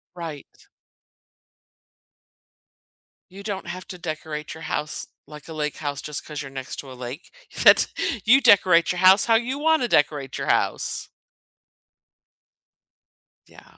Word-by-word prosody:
Right. 165 -5 -7 2.9
You 195 +2 -11
don't 200 -4 -5
have 180 +1 -7
to 180 - -8
decorate 155 -2 -6
your 160 - -11
house 155 -2 -3 0.2
like 150 0 -12
a 160 - -8
lake 150 -1 -3
house 145 -2 -4
just 150 -1 -6
'cause 150 -1 -6
you're 135 - -8
next 135 -1 -7
to 135 - -8
a - - -8
lake. 125 +5 -8 0.3
That's - - +7 0.4
you 260 +5 +6
decorate 185 -8 +5
your 180 - -4
house 190 +2 +6
how 225 -1 +4
you 250 +5 -1
wanna 315 -5 +2
decorate 145 - 0
your - - -4
house. - - 0 2.4
Yeah. - - -19
160 Hz, 135 wpm, -23 LUFS, 150-195 Hz, 2.9 s, That's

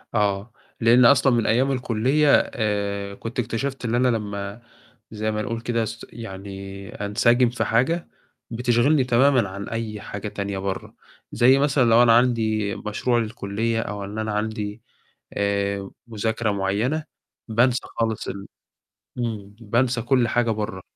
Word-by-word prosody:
آه، 100 +1 0 0.3
لإن 120 +2 +6
أصلًا 135 0 +5
من 115 -2 +1
أيام 130 +5 +2
الكُلّية 130 +3 +1 0.3
آآ 100 -2 -2
كنت 115 +4 -6
اكتشفت 125 +3 -3
اللي 115 +1 +1
أنا 125 +1 +3
لمّا 105 -2 -3 0.5
زي 110 0 -2
ما 105 0 -2
نقُول 115 +2 -3
كده 115 -1 0
أس 115 +1 -6
يعني 100 -2 -8
أنسجم 120 +4 +2
في 120 -2 -2
حاجة، 130 +11 +1 0.4
بتشغلني 125 +4 +2
تمامًا 125 -2 +3
عن 100 +1 -7
أي 110 -2 -4
حاجة 100 +1 -6
تانية 100 -1 -4
بَرّه، 95 0 -4 0.4
زي 130 +3 +5
مثلًا 140 -1 +3
لو 115 +2 +6
أنا 115 -1 +6
عندي 110 -4 +1
مشروع 120 +3 -1
للكُلّية 115 0 -2
أو 105 -2 -5
إن 100 +2 -7
أنا 110 0 -2
عندي 105 0 -3 0.5
آآ 100 -1 -1 0.2
مذاكرة 110 0 -1
معيّنة، 105 +10 -1 0.4
بانسى 120 +2 +2 0.2
خالص 110 -1 -1
ال 100 0 -6 0.7
إمم، 105 -4 -4
بانسى 120 +3 +1
كل 120 0 +2
حاجة 120 -1 +1
بَرّه. 105 -3 -3
115 Hz, 145 wpm, -23 LUFS, 100-120 Hz, 0.7 s, لإن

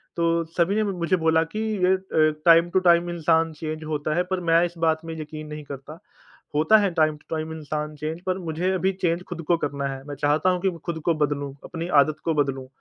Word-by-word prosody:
तो 170 0 +1
सभी 180 +3 +2
ने 215 - +2
मुझे 185 -4 0
बोला 160 -1 +3
कि 165 +6 -6 0.2
ये 185 +1 +5
अ, 160 -5 +1
टाइम 170 0 +6
टू 190 - +2
टाइम 170 0 +4
इंसान 165 -1 +2
चेंज 155 0 -4
होता 155 0 -2
है 180 - +2
पर 185 - +1
मैं 165 +1 +5
इस 175 - -5
बात 160 0 +1
में 165 - -5
यकीन 155 0 -7
नहीं 150 0 -7
करता। 145 +3 -9 0.6
होता 160 +9 +5
है 205 -2 +2
टाइम 155 -2 +2
टू 155 - -6
टाइम 160 0 -4
इंसान 150 0 -4
चेंज 155 +3 -4
पर 185 0 0
मुझे 170 +1 -2
अभी 190 +1 +1
चेंज 170 -1 +1
ख़ुद 175 -2 -5
को 170 - +3
करना 140 -3 -3
है। 135 -1 -6
मैं 145 - -5
चाहता 150 +5 +2
हूँ 180 -1 0
कि 195 - +2
मैं 170 -2 -8
ख़ुद 170 -2 -2
को 170 - +3
बदलूँ 145 -2 -1
अपनी 165 0 -5
आदत 155 +1 -1
को 165 - +2
बदलूँ 135 -2 -3
160 Hz, 235 wpm, -24 LUFS, 150-175 Hz, 0.6 s, टाइम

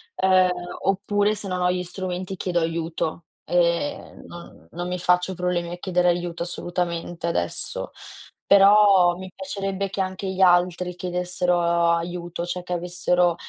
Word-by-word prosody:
ehm, 185 -1 +4 0.3
oppure 205 +2 +1
se 205 -1 -5
non 180 -1 -2
ho 180 0 +3
gli 180 0 -2
strumenti, 185 +1 -5
chiedo 175 -1 0
aiuto, 165 0 -3 0.2
ehm, 170 -3 0
non 175 0 -12
non 175 +2 -5
mi 180 0 -3
faccio 180 +1 +2
problemi 175 -1 -2
a 175 - -5
chiedere 180 -1 +1
aiuto 175 -1 -2
assolutamente, 175 -1 -3
adesso. 85 - -2 0.5
Però 195 -3 +6
mi 185 0 -9
piacerebbe 195 0 -3
che 195 - -6
anche 190 +1 -4
gli 190 0 -3
altri 180 0 +3
chiedessero 180 0 -1 0.3
aiuto, 175 +1 -3
cioè 180 +1 -4
che 180 - -4
avessero 175 0 +1
180 Hz, 140 wpm, -24 LUFS, 175-185 Hz, 0.5 s, Però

